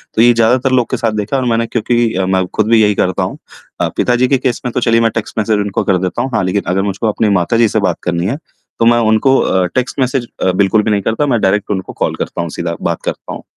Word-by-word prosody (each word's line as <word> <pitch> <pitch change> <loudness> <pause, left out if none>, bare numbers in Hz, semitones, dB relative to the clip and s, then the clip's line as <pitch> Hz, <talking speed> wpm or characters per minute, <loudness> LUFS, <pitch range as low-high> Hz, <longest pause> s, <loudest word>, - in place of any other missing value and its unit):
तो 110 - +3
ये 120 +1 +6
ज़्यादातर 120 +3 +2
लोगों 125 -2 +3
के - - 0
साथ 115 - 0
देखा 105 +6 -3
है - - 0
और - - -1
मैंने 115 0 0
क्योंकि 120 0 0
अ, 95 0 0
मैं 95 0 +1
ख़ुद 110 - +1
भी 115 -1 +5
यही 105 -1 +3
करता 90 -2 0
हूँ - - -4 0.4
अ, - - +2
पिता 125 - +2
जी 125 +1 +2
के 135 - +2
केस 130 -2 -2
में 125 - -1
तो - - 0
चलिए 115 -1 +2
मैं 115 -1 +2
टेक्स्ट 115 0 -5
मैसेज 110 -1 +1
उनको 100 -1 -1
कर 95 - +2
देता 90 0 -2
हूँ। 130 - -2
हाँ, - - +1
लेक़िन 95 +2 -1
अगर 95 - +1
मुझको 100 +4 -3
अपनी 105 0 0
माताजी 115 +6 +2
से 110 - 0
बात 100 - 0
करनी 85 0 -1
है, 120 +9 -1 0.4
तो 115 - +3
मैं 120 +1 +5
उनको 110 +5 +3
अ, 95 -1 +1
टेक्स्ट 130 +2 -2
मैसेज 130 -1 0 0.2
अ, 95 - +3
बिल्कुल 100 +3 +2
भी 110 - 0
नहीं 100 -1 +1
करता, 110 +8 0
मैं 120 -4 +1
डायरेक्ट 100 +2 +1
उनको 95 -2 -4
कॉल - - -1
करता - - -4
हूँ, - - -4
सीधा - - -2 0.2
बात - - -5
करता - - -5
हूँ। - - -9
110 Hz, 285 wpm, -15 LUFS, 100-120 Hz, 0.4 s, ये